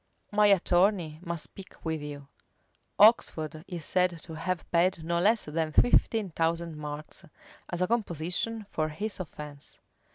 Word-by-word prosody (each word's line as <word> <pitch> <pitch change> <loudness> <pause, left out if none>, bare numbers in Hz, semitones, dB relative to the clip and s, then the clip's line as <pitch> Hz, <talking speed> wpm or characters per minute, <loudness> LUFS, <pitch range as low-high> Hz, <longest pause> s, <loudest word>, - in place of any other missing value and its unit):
My 210 0 +5
attorney 180 -4 +3
must 170 -3 -4
speak 190 +1 -13
with 160 -1 -2
you." 145 -1 -8 0.7
Oxford 160 -8 +4
is 170 -5 -6
said 180 -2 +1
to 165 - -9
have 170 +3 -3
paid 175 0 +2
no 170 +1 0
less 215 +5 +3
than 155 +1 -2
fifteen 220 0 +3
thousand 165 0 -1
marks, 150 +3 -7 0.5
as 175 +1 -1
a - - +1
composition 210 +1 -1
for 155 0 -1
his 205 +8 -4
offence. 150 -4 -9
170 Hz, 140 wpm, -29 LUFS, 155-190 Hz, 0.7 s, My